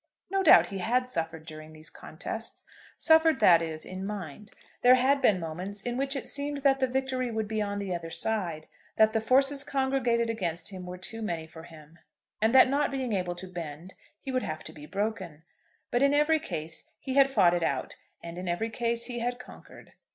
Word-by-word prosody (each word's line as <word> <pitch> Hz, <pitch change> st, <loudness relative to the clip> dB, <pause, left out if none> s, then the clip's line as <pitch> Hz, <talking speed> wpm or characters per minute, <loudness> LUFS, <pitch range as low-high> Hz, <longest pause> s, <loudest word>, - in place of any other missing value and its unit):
No 390 Hz, 0 st, +2 dB
doubt -, -, +7 dB
he 195 Hz, -, -5 dB
had 250 Hz, +6 st, 0 dB
suffered 160 Hz, -5 st, -3 dB
during 155 Hz, 0 st, -10 dB
these 155 Hz, +1 st, -10 dB
contests, -, -, -7 dB, 0.3 s
suffered, 320 Hz, -4 st, +4 dB
that 175 Hz, -6 st, +6 dB
is, 160 Hz, -1 st, -4 dB
in 185 Hz, +1 st, -6 dB
mind. 200 Hz, -1 st, -6 dB, 0.3 s
There 250 Hz, +1 st, +7 dB
had 270 Hz, +2 st, +2 dB
been 210 Hz, -8 st, +4 dB
moments 180 Hz, +5 st, -5 dB
in 245 Hz, 0 st, -2 dB
which 270 Hz, +2 st, -1 dB
it 275 Hz, -, -4 dB
seemed 285 Hz, 0 st, -3 dB
that 270 Hz, -1 st, +4 dB
the 260 Hz, -, +2 dB
victory 260 Hz, -1 st, -1 dB
would 220 Hz, -2 st, -2 dB
be 215 Hz, 0 st, -2 dB
on 205 Hz, -1 st, -2 dB
the 200 Hz, -2 st, -3 dB
other 170 Hz, -1 st, -5 dB
side, 170 Hz, -2 st, -2 dB, 0.3 s
that 220 Hz, 0 st, +4 dB
the 225 Hz, -, +1 dB
forces 270 Hz, +4 st, +3 dB
congregated 265 Hz, -4 st, 0 dB
against 175 Hz, -7 st, -2 dB
him 185 Hz, -2 st, -8 dB
were 180 Hz, 0 st, -6 dB
too 225 Hz, +5 st, -7 dB
many 170 Hz, -7 st, -3 dB
for 160 Hz, 0 st, -12 dB
him, 160 Hz, 0 st, -15 dB, 0.4 s
and 220 Hz, +1 st, +3 dB
that 265 Hz, -, +9 dB
not 280 Hz, +2 st, +1 dB
being 260 Hz, -4 st, -2 dB
able 180 Hz, -2 st, -1 dB
to 185 Hz, +2 st, -8 dB
bend 170 Hz, 0 st, -8 dB, 0.3 s
he 270 Hz, -, -6 dB
would 255 Hz, -1 st, 0 dB
have 155 Hz, -6 st, -5 dB
to 160 Hz, -, -9 dB
be 150 Hz, -1 st, -11 dB
broken; 195 Hz, -6 st, -4 dB, 0.5 s
but 240 Hz, -, +1 dB
in 280 Hz, +1 st, +4 dB
every 305 Hz, +2 st, +3 dB
case 160 Hz, -, -6 dB
he 265 Hz, -, -4 dB
had 275 Hz, 0 st, +5 dB
fought 190 Hz, -9 st, +4 dB
it 175 Hz, -, 0 dB
out, 140 Hz, -5 st, -2 dB, 0.3 s
and 170 Hz, +1 st, -7 dB
in 185 Hz, -, -6 dB
every 200 Hz, +7 st, -1 dB
case 235 Hz, 0 st, -1 dB
he 240 Hz, -1 st, -4 dB
had 245 Hz, +1 st, -2 dB
conquered. 250 Hz, -, -14 dB
215 Hz, 210 wpm, -28 LUFS, 170-255 Hz, 0.5 s, that